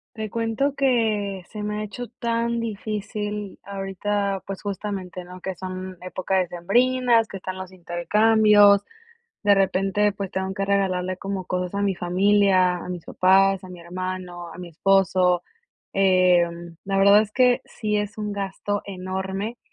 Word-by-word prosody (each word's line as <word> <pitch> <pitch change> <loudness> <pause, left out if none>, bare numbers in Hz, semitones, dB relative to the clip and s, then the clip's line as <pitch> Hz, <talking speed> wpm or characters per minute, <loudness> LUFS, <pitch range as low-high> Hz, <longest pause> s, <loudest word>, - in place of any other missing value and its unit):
Te 220 -1 -4
cuento 230 +6 -1
que 220 -8 +1
se 210 -1 -6
me 210 0 -2
ha - - -3
hecho 245 +4 -6
tan 235 0 -1
difícil 210 -2 -4
ahorita, 200 0 -2
pues, 195 -1 -6
justamente, 195 -3 -5
¿no?, 180 +1 -11
que 190 0 -4
son 185 +1 -6
épocas 185 0 -1
decembrinas, 235 +6 +2
que 195 - -7
están 185 0 -6
los 185 0 -7
intercambios. 205 +3 +4 0.6
De 205 -1 +5
repente, 195 +1 +2
pues, 195 -2 -5
tengo 190 0 -3
que 195 0 -1
regalarle 185 -2 0
como 195 -1 -4
cosas 180 +1 -3
a 200 - -1
mi 200 -1 +1
familia, 185 0 +3
a 175 - -8
mis 180 -2 -6
papás, 195 +1 +3
a - - -9
mi 180 -1 -10
hermano, 180 0 -6
a - - -11
mi 180 -1 -8
esposo. 185 0 +2 0.5
Eh, 185 -2 +4 0.4
la 195 0 -1
verdad 200 +2 +7
es 215 -1 -2
que 250 +1 +3
sí 210 -2 -2
es 205 0 -4
un 210 -1 -3
gasto 200 +1 -3
enorme 190 +3 -4
195 Hz, 155 wpm, -24 LUFS, 185-210 Hz, 0.6 s, verdad